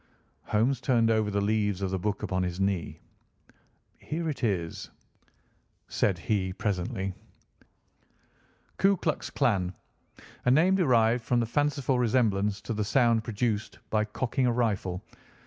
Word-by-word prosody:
Holmes 120 +4 +1
turned 115 -2 +3
over 110 -1 +2
the 100 0 0
leaves 105 -2 0
of 95 - -1
the 95 - -1
book 105 +2 -2
upon 95 0 -1
his 90 0 -3
knee. 95 -3 -1 1.0
"Here 165 +2 -4
it 135 - -8
is," 90 -7 -2 1.0
said 95 -4 +1
he 95 +1 -1
presently: 95 -1 -2 1.7
"'Ku 195 0 +4
Klux 155 -2 -2
Klan. 95 -5 0 0.7
A - - +4
name 160 +9 +5
derived 120 -9 +3
from 120 0 +1
the 115 - +1
fanciful 140 0 0
resemblance 105 -4 +1
to 115 - -4
the 105 -1 -1
sound 115 0 +3
produced 110 -1 -2
by 110 -1 +2
cocking 125 +4 -1
a - - +3
rifle. 100 -6 -1
110 Hz, 135 wpm, -28 LUFS, 100-125 Hz, 1.7 s, name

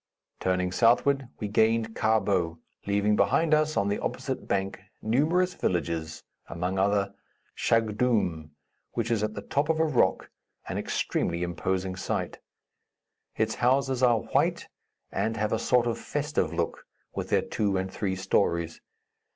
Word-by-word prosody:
Turning 90 -1 0
southward, 125 +5 +3
we 105 - -2
gained 110 +2 +2
Karbou, 95 -6 +1 0.3
leaving 100 +1 +2
behind 155 +8 +3
us, 155 0 +2
on 100 - +2
the 100 - 0
opposite - - -4
bank, 95 0 -1 0.2
numerous 160 +11 +2
villages, 85 - -2 0.2
among 90 +3 -2
other, 100 0 +1 0.4
Chagdoom, 110 -8 +1 0.4
which 115 -1 -1
is 115 -3 +2
at 105 0 -2
the - - -6
top 145 +2 0
of 160 0 +2
a 160 - +4
rock, 125 -11 +1 0.4
an - - -2
extremely 85 +1 -1
imposing 95 +2 -2
sight. 95 - -3 1.0
Its 110 0 0
houses 130 +1 +1
are 120 -3 +4
white - - 0 0.4
and 110 +3 -1
have 105 0 0
a 110 - +1
sort 125 +1 +3
of 120 -1 -1
festive 145 - -1
look, 85 - -2 0.3
with - - -4
their - - +3
two 100 -3 0
and 95 0 -3
three 95 -3 -1
stories. 85 -3 0
105 Hz, 145 wpm, -27 LUFS, 95-120 Hz, 1.0 s, a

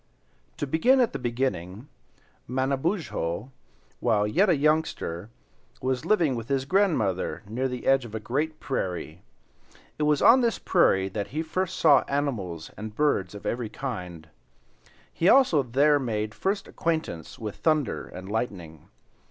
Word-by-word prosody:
To - - -2
begin 240 - +3
at 245 -3 +2
the - - -3
beginning, 120 -3 -3 0.6
Manabozho, 135 - -1 0.5
while 110 -4 +2
yet 180 - +3
a 175 - +5
youngster, 145 - 0 0.5
was 130 -1 -2
living 170 -10 +3
with 115 -1 -5
his 135 -1 0
grandmother 140 - +1
near 125 +5 -1
the 125 -1 -6
edge 135 -1 +4
of 110 -2 -8
a - - -2
great 150 +8 -2
prairie. 90 - -4 0.8
It - - +1
was 150 -2 +3
on 255 +2 +7
this 235 -2 +1
prairie 95 - +3
that 100 0 -4
he 155 +8 -3
first 185 +3 -2
saw 145 -4 +6
animals 105 - -3
and 105 0 -7
birds 105 -10 +1
of 100 - -10
every 120 -2 -2
kind; 90 - -6 0.9
he 170 - +2
also 255 - +5
there 140 +4 +3
made 110 -4 -2
first 195 - -2
acquaintance 160 - -3
with 105 -3 -6
thunder 155 -4 0
and 95 +1 -9
lightning. 95 -8 -4
130 Hz, 145 wpm, -26 LUFS, 105-155 Hz, 0.9 s, on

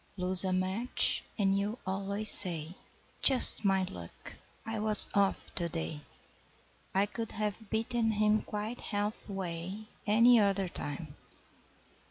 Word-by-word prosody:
Lose 185 0 +9
a 185 - -2
match 190 +7 0
and 195 -3 0
you 205 +4 -4
always 200 +2 0
say, 170 -4 +4 0.5
'Just 260 -4 +5
my 195 -1 0
luck! 90 - -11 0.3
I 225 -1 -5
was 215 0 +4
'off' 200 -1 -2
to 170 -2 -2
day! 160 -2 -6 0.9
I 195 +1 +2
could 225 +2 -7
have 210 0 -6
beaten 225 +1 -2
him 215 0 0
quite 215 +3 -7
half 210 0 -5
way 190 +2 -7 0.2
Any 230 +3 +4
other 195 -2 -1
time!' 145 -2 -6
200 Hz, 130 wpm, -29 LUFS, 185-215 Hz, 0.9 s, Lose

